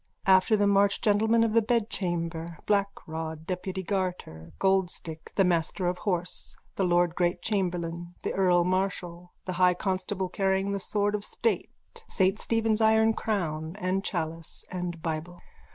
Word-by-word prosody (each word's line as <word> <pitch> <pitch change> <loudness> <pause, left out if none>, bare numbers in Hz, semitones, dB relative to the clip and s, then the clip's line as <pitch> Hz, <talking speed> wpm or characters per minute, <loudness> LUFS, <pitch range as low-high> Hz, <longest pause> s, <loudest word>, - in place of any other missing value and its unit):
After 190 +3 +5
them 205 0 +3
march 200 0 +3
gentlemen 220 +1 +3
of 225 -1 +1
the 230 - +5
bedchamber, 175 -7 -2
Black 200 -1 +2 0.2
Rod, 160 0 -5
Deputy 185 +1 -3
Garter, 180 - -3
Gold 190 -2 +2
Stick, 160 -2 -9
the 195 - +4
master 180 +1 0
of 180 0 -1
horse, 180 -2 -3 0.2
the 195 - 0
lord 175 -1 +3
great 175 0 0
chamberlain, 175 -4 -2
the - - -1
earl 180 -2 +3
marshal, 180 -1 -2
the 185 - -3
high 180 -1 +5
constable 190 0 -2
carrying 195 +1 0
the 200 - -1
sword 205 +1 0
of 210 -1 -2
state, 460 - -1 0.4
saint 195 +2 +2
Stephen's 225 -1 +1
iron 220 0 +5
crown, 165 -8 -2
the 190 -1 -1
chalice 165 -3 -4
and 175 -2 -4
bible. 165 +2 -4
185 Hz, 150 wpm, -28 LUFS, 175-200 Hz, 0.4 s, After